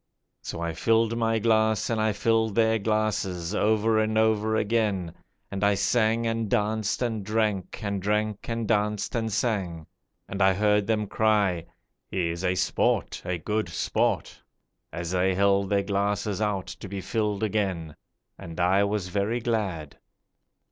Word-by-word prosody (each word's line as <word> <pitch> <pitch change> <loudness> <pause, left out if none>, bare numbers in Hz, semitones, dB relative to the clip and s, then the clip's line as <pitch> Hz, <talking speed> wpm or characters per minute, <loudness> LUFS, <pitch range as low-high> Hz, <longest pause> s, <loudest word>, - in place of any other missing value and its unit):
So - - -6
I 85 -1 -2
filled 115 +5 +2
my 115 -1 +1
glass, 110 -1 +2
and 110 -1 0
I 110 0 +2
filled 110 0 +1
their 110 -1 +3
glasses, 100 -4 -1
over 110 +1 +2
and 110 0 +1
over 110 0 +2
again, 105 -6 0 0.4
And 100 0 -3
I 100 0 +4
sang 110 +3 +2
and 115 -1 -1
danced 110 0 0
and 110 -4 -2
drank, 105 -2 -1
and 100 -2 -2
drank 105 +2 -1
and 115 -1 -2
danced 105 -1 0
and 115 -2 -1
sang, 95 -8 -1 0.4
And 100 0 -4
I 95 0 +5
heard 105 0 +2
them 110 -1 +1
cry, 100 -5 +1 0.4
'He 85 -3 -1
is 85 +2 -5
a 90 0 +1
sport, - - 0
a 90 0 -2
good 105 +3 -2
sport!' 80 - -1 0.5
As 85 +1 -4
they 95 0 +1
held 100 0 +2
their 100 -1 +2
glasses 100 0 -1
out 100 -3 0
to - - -8
be 100 0 -4
filled 105 0 -1
again. 95 -7 -1 0.4
And 85 +1 -8
I 95 +3 +3
was 100 -2 -1
very 100 +5 0
glad. 100 -11 -3
105 Hz, 155 wpm, -26 LUFS, 95-110 Hz, 0.5 s, I